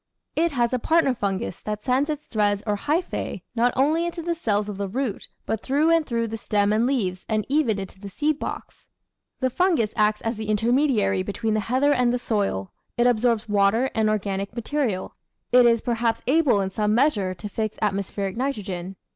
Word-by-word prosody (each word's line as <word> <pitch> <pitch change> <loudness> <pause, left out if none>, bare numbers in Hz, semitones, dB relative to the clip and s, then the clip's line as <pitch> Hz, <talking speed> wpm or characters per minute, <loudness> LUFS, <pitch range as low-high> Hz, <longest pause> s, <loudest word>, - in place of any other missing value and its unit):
It 330 0 +1
has 240 -2 +1
a 255 - +1
partner 320 0 +3
fungus 200 -2 -3
that 210 0 -4
sends 265 +4 +1
its 300 -1 -3
threads 205 -2 0
or 210 -2 +1
hypha? 310 - -2
not 240 +1 +3
only 305 +6 +2
into 340 -1 -5
the 340 +1 0
cells 210 -10 0
of 205 -2 -5
the 200 0 -2
root, 235 +1 -3 0.2
but 220 - -2
through 295 +5 +2
and 330 -1 +4
through 230 -5 -1
the 225 +1 -5
stem 205 -1 +1
and 225 +3 +2
leaves, 190 -9 -1
and 215 -1 0
even 275 -7 +2
into 195 -1 -7
the 200 0 -8
seed 300 +9 -1
box. - - -7 0.5
The 260 0 +1
fungus 325 - +1
acts 210 -1 +2
as 225 0 -2
the 215 -1 -5
intermediary 215 -3 +2
between 215 +3 -2
the 215 - +1
heather 260 +7 +2
and 250 -3 +2
the 245 - +1
soil; 200 - -1 0.3
it 240 - +3
absorbs 235 -2 +2
water 210 +5 +2
and 220 -1 +2
organic 200 0 -2
material; 235 -5 -2 0.4
it 245 -1 +7
is 230 -1 +3
perhaps 230 -1 -1
able 270 -6 +3
in 190 0 -2
some 210 +2 +1
measure 215 -9 +2
to 210 - -7
fix 215 +1 -3
atmospheric 195 -1 -2
nitrogen. 195 -8 -3
225 Hz, 195 wpm, -24 LUFS, 205-265 Hz, 0.5 s, it